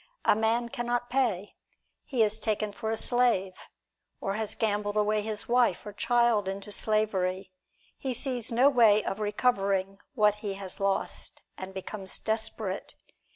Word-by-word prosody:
A -, -, +5 dB
man 225 Hz, +2 st, +1 dB
can 240 Hz, 0 st, -4 dB
not 245 Hz, 0 st, -1 dB
pay, 225 Hz, -7 st, 0 dB, 0.5 s
he 250 Hz, -5 st, +2 dB
is 215 Hz, +1 st, +1 dB
taken 215 Hz, -1 st, 0 dB
for 220 Hz, +2 st, -5 dB
a 225 Hz, -, -1 dB
slave, 235 Hz, -7 st, +2 dB, 0.7 s
or 195 Hz, -, -2 dB
has 215 Hz, 0 st, -2 dB
gambled 205 Hz, -1 st, -1 dB
away 210 Hz, 0 st, +2 dB
his 210 Hz, -1 st, -3 dB
wife 240 Hz, -6 st, +2 dB
or 210 Hz, -, -7 dB
child 235 Hz, -2 st, +2 dB
into 195 Hz, +2 st, -5 dB
slavery, 195 Hz, -4 st, 0 dB, 0.5 s
he 265 Hz, -, -2 dB
sees 250 Hz, -2 st, -2 dB
no 245 Hz, +4 st, +5 dB
way 225 Hz, -6 st, +5 dB
of 195 Hz, -, -3 dB
recovering 200 Hz, -3 st, 0 dB, 0.2 s
what 210 Hz, -3 st, +3 dB
he 200 Hz, -2 st, -3 dB
has 195 Hz, -2 st, -6 dB
lost, 195 Hz, 0 st, -1 dB
and 190 Hz, 0 st, -6 dB
becomes 190 Hz, 0 st, -6 dB
desperate. 220 Hz, -3 st, -3 dB
215 Hz, 155 wpm, -28 LUFS, 195-235 Hz, 0.7 s, A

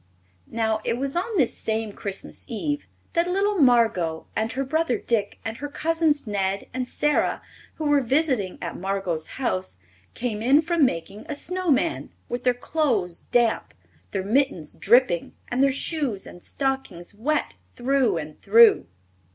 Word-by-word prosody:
Now 220 Hz, -1 st, 0 dB
it 230 Hz, -, 0 dB
was 275 Hz, +3 st, -3 dB
on 380 Hz, +5 st, -1 dB
this 265 Hz, -8 st, +3 dB
same 220 Hz, -1 st, -2 dB
Christmas 200 Hz, -1 st, -6 dB
Eve 290 Hz, +6 st, -3 dB, 0.3 s
that 340 Hz, -1 st, +2 dB
little 400 Hz, +2 st, +1 dB
Margot 225 Hz, -, +3 dB
and 220 Hz, +1 st, 0 dB
her 270 Hz, -, -1 dB
brother 310 Hz, -1 st, 0 dB
Dick 210 Hz, -4 st, -1 dB
and 225 Hz, 0 st, -4 dB
her 290 Hz, -, -4 dB
cousins 315 Hz, -1 st, +1 dB
Ned 195 Hz, -2 st, -1 dB
and 255 Hz, -1 st, -2 dB
Sara, 295 Hz, +3 st, +1 dB, 0.4 s
who 315 Hz, -, -5 dB
were 290 Hz, -1 st, +4 dB
visiting 255 Hz, -, +1 dB
at 170 Hz, -, -4 dB
Margot's 190 Hz, -4 st, -2 dB
house, 95 Hz, 0 st, -2 dB, 0.4 s
came 230 Hz, -3 st, -3 dB
in 275 Hz, +7 st, +5 dB
from 335 Hz, -2 st, +3 dB
making 195 Hz, +3 st, -5 dB
a 300 Hz, -, -2 dB
snow 365 Hz, +4 st, -3 dB
man, 315 Hz, +4 st, +1 dB, 0.2 s
with 245 Hz, +1 st, -4 dB
their 250 Hz, -1 st, +4 dB
clothes 240 Hz, -, -1 dB
damp, 240 Hz, -2 st, +1 dB, 0.3 s
their 190 Hz, -, -2 dB
mittens 220 Hz, -, 0 dB
dripping 235 Hz, -6 st, +3 dB, 0.2 s
and 245 Hz, +2 st, 0 dB
their 275 Hz, 0 st, +5 dB
shoes 275 Hz, -, -2 dB
and 175 Hz, -, -11 dB
stockings 265 Hz, -12 st, -3 dB
wet 285 Hz, +9 st, -1 dB, 0.2 s
through 260 Hz, -4 st, +2 dB
and 155 Hz, -1 st, -7 dB
through. 230 Hz, +3 st, +6 dB
245 Hz, 155 wpm, -24 LUFS, 200-290 Hz, 0.4 s, through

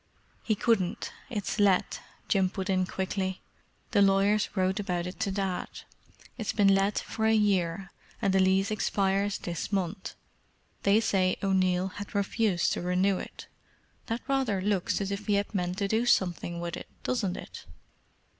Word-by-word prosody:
"He 215 Hz, -, 0 dB
couldn't—it's 215 Hz, 0 st, -1 dB
let," 200 Hz, -3 st, +3 dB, 0.3 s
Jim 190 Hz, -3 st, +2 dB
put 195 Hz, 0 st, -3 dB
in 185 Hz, -1 st, +1 dB
quickly. 190 Hz, 0 st, -3 dB, 0.5 s
"The 205 Hz, -5 st, +4 dB
lawyers 200 Hz, +1 st, +3 dB
wrote 190 Hz, +1 st, +1 dB
about 180 Hz, -4 st, -2 dB
it 180 Hz, -, -7 dB
to -, -, 0 dB
Dad. 190 Hz, -2 st, -2 dB, 0.7 s
It's 220 Hz, -, -2 dB
been 200 Hz, -2 st, +5 dB
let 195 Hz, +1 st, +2 dB
for 220 Hz, 0 st, -1 dB
a 220 Hz, -, +4 dB
year, 195 Hz, -3 st, +1 dB, 0.3 s
and 200 Hz, -4 st, +1 dB
the 190 Hz, -, +4 dB
lease 190 Hz, +2 st, +3 dB
expires 200 Hz, -1 st, +1 dB
this 170 Hz, +2 st, -5 dB
month—they 200 Hz, +2 st, -2 dB
said 185 Hz, -4 st, +1 dB
O'Neill 185 Hz, -1 st, +2 dB
had 205 Hz, +1 st, -8 dB
refused 200 Hz, -2 st, +1 dB
to -, -, -3 dB
renew 185 Hz, +2 st, +1 dB
it. -, -, -9 dB, 0.6 s
That 230 Hz, +1 st, -4 dB
rather 265 Hz, -8 st, +1 dB
looks 195 Hz, 0 st, 0 dB
as 200 Hz, 0 st, -2 dB
if 200 Hz, +2 st, -4 dB
he 205 Hz, -, +3 dB
had 200 Hz, +2 st, -1 dB
meant 180 Hz, -2 st, -1 dB
to 200 Hz, -1 st, 0 dB
do 225 Hz, +4 st, +1 dB
something 175 Hz, -5 st, +1 dB
with 170 Hz, -1 st, -4 dB
it, -, -, -9 dB, 0.2 s
doesn't 200 Hz, -8 st, -1 dB
it?" -, -, -10 dB
195 Hz, 155 wpm, -28 LUFS, 185-210 Hz, 0.7 s, been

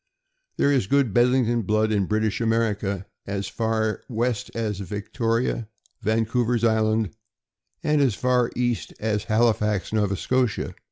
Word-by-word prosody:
There 140 Hz, -, +3 dB
is 130 Hz, -9 st, +2 dB
good 140 Hz, -4 st, +2 dB
Bedlington 120 Hz, 0 st, +3 dB
blood 110 Hz, +1 st, +1 dB
in 100 Hz, -3 st, +1 dB
British 110 Hz, +1 st, 0 dB
America, 105 Hz, -4 st, 0 dB, 0.2 s
as 100 Hz, 0 st, -3 dB
far 110 Hz, -1 st, -1 dB
west 120 Hz, -1 st, -1 dB
as 110 Hz, -4 st, -2 dB
Victoria, 115 Hz, +4 st, -2 dB, 0.3 s
Vancouver's 115 Hz, +2 st, +1 dB
Island, 110 Hz, -3 st, +2 dB, 0.7 s
and 150 Hz, -1 st, +2 dB
as 130 Hz, -7 st, +2 dB
far 125 Hz, 0 st, +2 dB
east 120 Hz, -2 st, -1 dB
as 105 Hz, -1 st, -1 dB
Halifax, 105 Hz, -3 st, +1 dB
Nova 105 Hz, -3 st, +1 dB
Scotia. 125 Hz, +2 st, 0 dB
110 Hz, 125 wpm, -24 LUFS, 105-120 Hz, 0.7 s, There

